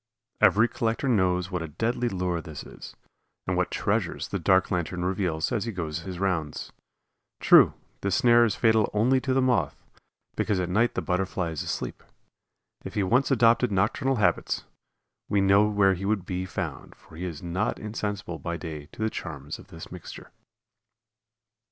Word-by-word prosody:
Every 110 Hz, +3 st, +5 dB
collector 115 Hz, +3 st, -1 dB
knows 90 Hz, -5 st, +1 dB
what 90 Hz, -2 st, -2 dB
a 80 Hz, -, -4 dB
deadly 115 Hz, +10 st, -1 dB
lure 90 Hz, -4 st, -2 dB
this 80 Hz, -4 st, -8 dB
is, -, -, -11 dB, 0.5 s
and -, -, -1 dB
what -, -, +1 dB
treasures -, -, -1 dB
the -, -, -2 dB
dark 95 Hz, 0 st, +3 dB
lantern 90 Hz, 0 st, -1 dB
reveals 90 Hz, -4 st, -1 dB
as 115 Hz, -3 st, -1 dB
he 115 Hz, -, -3 dB
goes 80 Hz, -5 st, -4 dB
his 90 Hz, +1 st, -7 dB
rounds. 90 Hz, -6 st, -2 dB, 0.7 s
True, -, -, +6 dB, 0.3 s
this 100 Hz, -1 st, 0 dB
snare 120 Hz, +3 st, +5 dB
is 115 Hz, -4 st, +1 dB
fatal 110 Hz, -2 st, +3 dB
only 125 Hz, +5 st, +3 dB
to 135 Hz, -, -2 dB
the 130 Hz, 0 st, +3 dB
Moth, 125 Hz, -2 st, 0 dB, 0.5 s
because 105 Hz, -3 st, 0 dB
at 90 Hz, -1 st, -1 dB
night 115 Hz, +6 st, +2 dB
the -, -, -1 dB
Butterfly 90 Hz, -2 st, -1 dB
is 80 Hz, -, -4 dB
asleep. -, -, -4 dB, 0.8 s
If -, -, -8 dB
he 105 Hz, -, +1 dB
once 125 Hz, +8 st, +2 dB
adopted 120 Hz, -2 st, +4 dB
nocturnal 105 Hz, +7 st, +1 dB
habits 95 Hz, -7 st, +1 dB, 0.7 s
we 100 Hz, -, +2 dB
know 100 Hz, +2 st, +5 dB
where 100 Hz, -2 st, +3 dB
he 95 Hz, +2 st, -5 dB
would 100 Hz, -3 st, 0 dB
be 90 Hz, 0 st, -3 dB
found, -, -, -5 dB
for -, -, -18 dB
he 90 Hz, +3 st, -5 dB
is 85 Hz, -3 st, -6 dB
not 90 Hz, +4 st, -1 dB
insensible 105 Hz, -5 st, -4 dB
by 85 Hz, 0 st, -4 dB
day 75 Hz, -3 st, -7 dB
to 110 Hz, -, -4 dB
the 110 Hz, -, +1 dB
charms 75 Hz, -1 st, -6 dB
of -, -, -14 dB
this 80 Hz, 0 st, -11 dB
mixture. 90 Hz, -2 st, -10 dB
95 Hz, 175 wpm, -26 LUFS, 85-110 Hz, 0.8 s, True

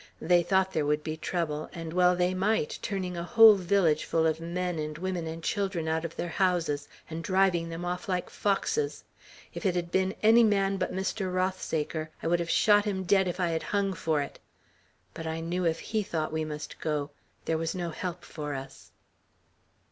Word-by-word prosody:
They 175 Hz, +1 st, +4 dB
thought 190 Hz, +1 st, +1 dB
there 150 Hz, -2 st, 0 dB
would 150 Hz, +1 st, +1 dB
be 155 Hz, -1 st, -3 dB
trouble; 160 Hz, -2 st, -3 dB
and 165 Hz, -1 st, -6 dB
well 180 Hz, 0 st, +4 dB
they 180 Hz, +1 st, +1 dB
might, 195 Hz, -3 st, 0 dB
turning 185 Hz, -3 st, -3 dB
a 170 Hz, -, -3 dB
whole 220 Hz, +5 st, +8 dB
village 180 Hz, -5 st, +2 dB
full 160 Hz, -1 st, +1 dB
of 160 Hz, 0 st, +1 dB
men 175 Hz, 0 st, -3 dB
and 150 Hz, 0 st, -4 dB
women 180 Hz, -1 st, -3 dB
and 165 Hz, +1 st, -6 dB
children 190 Hz, -5 st, -1 dB
out 160 Hz, 0 st, 0 dB
of 165 Hz, -1 st, -5 dB
their -, -, -3 dB
houses, 170 Hz, -6 st, 0 dB, 0.2 s
and 165 Hz, +1 st, -6 dB
driving 185 Hz, -3 st, +2 dB
them 165 Hz, +1 st, -5 dB
off 180 Hz, +5 st, -4 dB
like 180 Hz, -1 st, -1 dB
foxes. 425 Hz, -, -1 dB, 0.5 s
If -, -, -6 dB
it 190 Hz, -4 st, +1 dB
had 170 Hz, -1 st, -2 dB
been 190 Hz, +3 st, +1 dB
any 225 Hz, +2 st, +7 dB
man 195 Hz, -2 st, +2 dB
but 185 Hz, -, -1 dB
Mr. 190 Hz, 0 st, -2 dB
Rothsaker, 165 Hz, -4 st, -1 dB
I -, -, -5 dB
would 170 Hz, +1 st, +2 dB
have 170 Hz, -1 st, -3 dB
shot 205 Hz, +1 st, +4 dB
him 190 Hz, -2 st, -1 dB
dead, 190 Hz, +1 st, +3 dB
if 180 Hz, +1 st, -3 dB
I 175 Hz, -2 st, +1 dB
had 165 Hz, -1 st, -1 dB
hung 200 Hz, -1 st, 0 dB
for 160 Hz, -4 st, 0 dB
it; 140 Hz, -, -10 dB, 0.7 s
but 165 Hz, -, -6 dB
I 160 Hz, 0 st, -2 dB
knew 175 Hz, +2 st, -2 dB
if 160 Hz, 0 st, 0 dB
he 220 Hz, -1 st, -1 dB
thought 160 Hz, -5 st, -3 dB
we 160 Hz, 0 st, -1 dB
must 150 Hz, -1 st, -7 dB
go, 150 Hz, -2 st, -2 dB, 0.3 s
there 160 Hz, -1 st, 0 dB
was 165 Hz, +3 st, -2 dB
no 175 Hz, -2 st, -3 dB
help 180 Hz, +2 st, -5 dB
for 150 Hz, -2 st, -5 dB
us." 135 Hz, 0 st, -9 dB
175 Hz, 200 wpm, -28 LUFS, 160-190 Hz, 0.7 s, whole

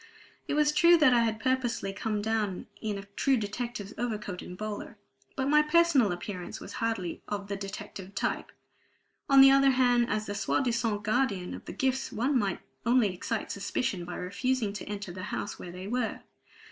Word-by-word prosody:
It -, -, -1 dB
was 300 Hz, 0 st, +4 dB
true 340 Hz, +3 st, +6 dB
that 285 Hz, -6 st, +5 dB
I 240 Hz, -, +5 dB
had 225 Hz, -1 st, +1 dB
purposely 245 Hz, -6 st, 0 dB
come 210 Hz, 0 st, -2 dB
down 215 Hz, -4 st, -1 dB, 0.2 s
in 215 Hz, -2 st, -2 dB
a 195 Hz, -, -6 dB
true 270 Hz, -2 st, +3 dB
detective's 215 Hz, -1 st, -4 dB
overcoat 210 Hz, -6 st, -3 dB
and 180 Hz, -, -9 dB
bowler; 215 Hz, +1 st, -5 dB, 0.4 s
but 265 Hz, 0 st, -1 dB
my 300 Hz, +1 st, +6 dB
personal 300 Hz, -, +4 dB
appearance 180 Hz, +3 st, -5 dB
was -, -, -9 dB
hardly 225 Hz, -7 st, -2 dB
of 200 Hz, -1 st, -4 dB
the 200 Hz, -, -1 dB
detective 195 Hz, 0 st, -7 dB
type. -, -, -2 dB, 0.8 s
On 275 Hz, -1 st, +8 dB
the 270 Hz, 0 st, +9 dB
other 275 Hz, 0 st, +6 dB
hand 245 Hz, -2 st, +3 dB
as 215 Hz, 0 st, -1 dB
the 205 Hz, -, -4 dB
soi 205 Hz, -, 0 dB
disant 230 Hz, -4 st, 0 dB
guardian 215 Hz, -5 st, 0 dB
of -, -, -9 dB
the -, -, -6 dB
gifts 265 Hz, 0 st, -1 dB
one 260 Hz, +6 st, 0 dB
might 195 Hz, -4 st, -1 dB, 0.2 s
only 235 Hz, -5 st, +3 dB
excite 180 Hz, -, -3 dB
suspicion 200 Hz, -2 st, -2 dB
by 175 Hz, -, -6 dB
refusing 215 Hz, +3 st, -1 dB
to 210 Hz, -, -6 dB
enter 205 Hz, -3 st, -5 dB
the 185 Hz, +1 st, -7 dB
house -, -, -4 dB
where 175 Hz, -, -7 dB
they 180 Hz, +1 st, -8 dB
were. 240 Hz, +2 st, -2 dB
220 Hz, 185 wpm, -29 LUFS, 200-255 Hz, 0.8 s, the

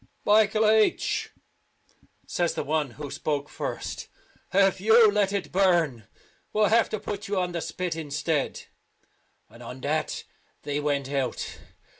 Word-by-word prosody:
" -, -, -41 dB
Michael 215 Hz, +1 st, +4 dB
H 215 Hz, 0 st, +2 dB, 0.5 s
," -, -, -36 dB
says 175 Hz, -1 st, -1 dB
the -, -, -2 dB
one 150 Hz, -1 st, 0 dB
who 145 Hz, -2 st, -6 dB
spoke 145 Hz, -2 st, -2 dB
first, -, -, -5 dB, 0.4 s
"if 195 Hz, -1 st, +3 dB
you 220 Hz, +1 st, +6 dB
let 205 Hz, -1 st, +2 dB
it 200 Hz, -2 st, -3 dB
burn 170 Hz, -, +2 dB, 0.5 s
we'll 210 Hz, -1 st, +3 dB
have 230 Hz, +1 st, +4 dB
to 215 Hz, -, -3 dB
put 205 Hz, +1 st, -5 dB
you 200 Hz, -1 st, 0 dB
on 180 Hz, -1 st, -1 dB
the 170 Hz, -1 st, -3 dB
spit 180 Hz, -1 st, -3 dB
instead; 150 Hz, -1 st, -2 dB, 0.4 s
" -, -, -43 dB
and 115 Hz, -, -14 dB
on 125 Hz, +2 st, -8 dB
that 155 Hz, +3 st, -1 dB, 0.4 s
they 145 Hz, 0 st, -2 dB
went 140 Hz, -2 st, -1 dB
out. 135 Hz, -2 st, -2 dB
175 Hz, 155 wpm, -26 LUFS, 145-205 Hz, 0.5 s, you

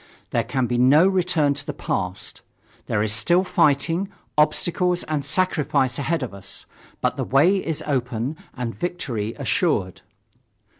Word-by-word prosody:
There -, -, +1 dB
can 130 Hz, -2 st, -1 dB
be 120 Hz, 0 st, -1 dB
no 145 Hz, +8 st, +6 dB
return 180 Hz, -6 st, +2 dB
to 145 Hz, +1 st, -4 dB
the -, -, -5 dB
past. 90 Hz, +1 st, -3 dB, 0.5 s
There 105 Hz, -, +1 dB
is 105 Hz, -1 st, +1 dB
still 175 Hz, +11 st, +3 dB
fighting, 165 Hz, +3 st, +2 dB, 0.3 s
obstacles 175 Hz, +4 st, +2 dB
and 150 Hz, -2 st, -2 dB
sacrifice 140 Hz, -6 st, +1 dB
ahead 160 Hz, +1 st, 0 dB
of 120 Hz, -, -5 dB
us. 100 Hz, -1 st, -7 dB, 0.4 s
But -, -, 0 dB
the -, -, -1 dB
way 155 Hz, +9 st, +4 dB
is 160 Hz, -3 st, -3 dB
open 125 Hz, 0 st, -1 dB, 0.2 s
and 120 Hz, -2 st, -3 dB
victory 125 Hz, -, -3 dB
assured. 135 Hz, -, 0 dB
145 Hz, 145 wpm, -23 LUFS, 125-175 Hz, 0.5 s, no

